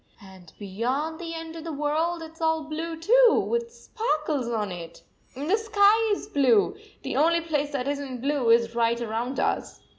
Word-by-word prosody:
"And 190 Hz, -4 st, -15 dB
beyond 250 Hz, +11 st, -3 dB
the 335 Hz, -1 st, -6 dB
end 325 Hz, 0 st, -7 dB
of 325 Hz, -, -7 dB
the 330 Hz, -, -5 dB
world, 315 Hz, +3 st, -1 dB
it 320 Hz, -, -9 dB
s 325 Hz, -, -18 dB
all 320 Hz, -1 st, +1 dB
blue 320 Hz, +2 st, -5 dB
too, 475 Hz, +7 st, +5 dB
with 470 Hz, 0 st, -1 dB
sparkles 305 Hz, -, -2 dB
on 215 Hz, -4 st, -2 dB
it! 170 Hz, -2 st, -9 dB, 0.3 s
And 280 Hz, +3 st, -5 dB
the 395 Hz, +5 st, +3 dB
sky 435 Hz, 0 st, +3 dB
is -, -, -8 dB
blue. 270 Hz, -, +3 dB, 0.3 s
The -, -, -4 dB
only 335 Hz, +2 st, +3 dB
place 295 Hz, -3 st, -1 dB
that 270 Hz, -1 st, -2 dB
is 285 Hz, 0 st, -1 dB
n 270 Hz, -3 st, -6 dB
t 245 Hz, -, -8 dB
blue 280 Hz, -4 st, +1 dB
is 230 Hz, 0 st, +4 dB
right 235 Hz, 0 st, +1 dB
around 240 Hz, +3 st, -3 dB
us." -, -, -1 dB
300 Hz, 200 wpm, -26 LUFS, 235-330 Hz, 0.3 s, too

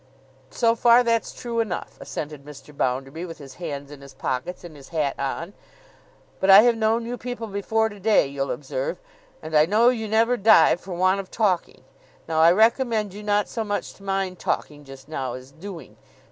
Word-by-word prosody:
'So 230 Hz, -1 st, +2 dB
far, 235 Hz, +1 st, +5 dB
that's 230 Hz, -1 st, 0 dB
true 235 Hz, -1 st, -4 dB
enough,' 210 Hz, -6 st, -3 dB
assented 150 Hz, -2 st, -6 dB
Mr. 145 Hz, 0 st, -13 dB
Bounderby, 135 Hz, +5 st, -2 dB
with 170 Hz, -2 st, -7 dB
his 135 Hz, -2 st, -11 dB
hands 145 Hz, -4 st, -5 dB
in 145 Hz, -1 st, -11 dB
his 140 Hz, -1 st, -13 dB
pockets 130 Hz, +9 st, -4 dB
and 170 Hz, -3 st, -10 dB
his 140 Hz, -2 st, -14 dB
hat 150 Hz, -4 st, -1 dB
on. 165 Hz, +7 st, -3 dB, 0.9 s
'But 190 Hz, -, 0 dB
I 195 Hz, +2 st, +10 dB
have 240 Hz, -1 st, +4 dB
known 225 Hz, +1 st, +1 dB
you 245 Hz, +1 st, -5 dB
people 245 Hz, -2 st, -5 dB
before 220 Hz, +2 st, 0 dB
to 205 Hz, -2 st, -10 dB
day, 210 Hz, -2 st, +3 dB
you'll 140 Hz, 0 st, -3 dB
observe, -, -, -4 dB, 0.4 s
and 155 Hz, 0 st, -5 dB
I 150 Hz, +1 st, +5 dB
know 220 Hz, +5 st, +4 dB
you 225 Hz, -3 st, -2 dB
never 225 Hz, +3 st, +2 dB
die 220 Hz, +1 st, +6 dB
for 180 Hz, +1 st, -8 dB
want 185 Hz, +2 st, +2 dB
of 195 Hz, -, -7 dB
talking. 190 Hz, -, -1 dB, 0.4 s
Now, 160 Hz, -1 st, 0 dB
I 165 Hz, +1 st, +7 dB
recommend 220 Hz, 0 st, +2 dB
you 205 Hz, -, -8 dB
not 205 Hz, 0 st, +1 dB
so 225 Hz, -, -3 dB
much 205 Hz, -1 st, -3 dB
to -, -, -21 dB
mind 195 Hz, -2 st, -2 dB
talking 145 Hz, -1 st, -3 dB
just 135 Hz, 0 st, -13 dB
now, 135 Hz, -5 st, -4 dB
as 130 Hz, +1 st, -10 dB
doing. 180 Hz, +3 st, -10 dB
190 Hz, 195 wpm, -24 LUFS, 145-220 Hz, 0.9 s, I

